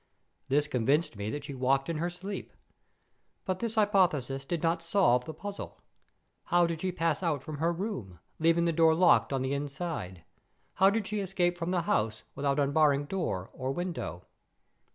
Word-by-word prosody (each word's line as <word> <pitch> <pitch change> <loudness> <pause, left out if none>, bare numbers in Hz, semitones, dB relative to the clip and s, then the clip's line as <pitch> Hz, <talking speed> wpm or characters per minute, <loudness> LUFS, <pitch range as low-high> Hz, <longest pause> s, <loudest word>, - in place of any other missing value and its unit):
This 145 +2 +2
convinced 140 +3 +1
me 100 +1 -4
that 145 +4 -4
she 145 -1 -6
walked 135 +1 +1
in 165 - -2
her 175 +2 0
sleep. 190 +3 -7 0.9
But 185 -1 -1
this 230 -1 -3
hypothesis 170 - +2
did 170 +2 -3
not 165 0 +1
solve 165 -8 +3
the 160 - -6
puzzle. 200 +4 -7 0.7
How 175 0 +4
did 165 -1 -3
she 185 - 0
pass 165 -3 0
out 155 -7 -1
from 155 -3 -6
her 165 +2 +2
room, 165 - -4 0.2
leaving 165 +1 +3
the 170 - +1
door 160 0 +5
locked 175 -3 +4
on 135 -1 0
the 130 +1 -1
inside? 140 - -4 0.5
How 195 +1 +5
did 215 0 -1
she 210 +1 -2
escape 180 -2 0
from 170 0 -3
the 180 -1 +1
house 110 -9 0
without 140 0 0
unbarring 145 0 +3
door 145 - -3
or 130 0 -3
window? 160 - -4
160 Hz, 175 wpm, -30 LUFS, 135-175 Hz, 0.9 s, door